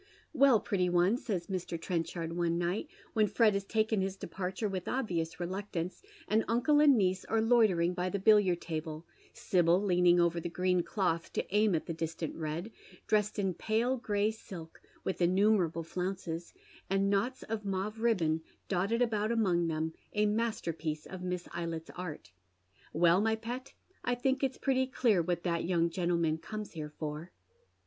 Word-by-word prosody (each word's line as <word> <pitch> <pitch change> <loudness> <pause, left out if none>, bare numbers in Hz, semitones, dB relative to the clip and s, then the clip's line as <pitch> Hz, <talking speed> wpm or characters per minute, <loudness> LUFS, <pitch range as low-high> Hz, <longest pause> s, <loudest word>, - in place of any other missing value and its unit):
" - - -32
Well, 275 -5 +6
pretty 185 -3 0
one," 175 +4 +3
says 190 -9 -3
Mr. 180 -3 -4
Trenchard 165 -1 -3
one 170 -1 +1
night, 175 - -1 0.3
when 215 -2 +3
Fred 215 +1 +4
has 200 0 -1
taken 220 0 +1
liis 190 0 -2
departure 190 +4 -3
with 185 -3 -4
obvious 175 -11 -2
reluctance, 185 -1 -4 0.3
and 220 +1 +2
uncle 265 +6 +3
and 290 -4 +6
niece 185 -2 +1
are 225 - +1
loitering 215 -7 +3
by 180 0 -1
the 200 - -1
billiard 195 -3 +4
table, 160 0 -5 0.3
Sibyl 175 -1 +2
leaning 180 -3 +4
over 170 0 +2
tli© 175 - -4
gi'een 180 0 +1
cloth 170 -5 -1
to - - -1
aim 210 -3 +4
at 160 - -2
the 165 - -3
distant 160 0 -4
red, 165 +6 -4 0.3
dressed 210 -1 +1
in 195 -3 0
pale 225 +7 0
gray 210 -3 0
silk, 175 -7 -10 0.2
with 190 - -3
innumerable 180 -2 +3
flounces, 175 -1 -4 0.4
and 195 +1 +2
knots 240 +6 0
of 220 -1 -4
mauve 200 +2 -3
ribbon 170 -9 +2 0.3
dotted 200 +6 +1
about 215 -2 0
among 185 -7 +2
them, 160 0 -2 0.2
a 210 0 +2
masterpiece 170 -8 -2
of 185 -1 -8
Miss 180 -1 -3
Eylett's 165 -1 -5
art. 160 - -7 0.3
" 90 +2 -31
Well, 170 +3 +4
jny 220 0 +1
pet, 245 +4 -6 0.3
I 245 - +1
ttiiuk 265 +2 0
it's 270 -1 0
pretty 260 -1 +1
clear 235 -7 +2
what 175 +1 -2
that 170 -2 0
young 170 -1 +1
gentleman 170 -2 0
comes 215 +3 -6
here 155 -2 -6
for." 150 +2 -6
185 Hz, 170 wpm, -32 LUFS, 170-215 Hz, 0.4 s, Well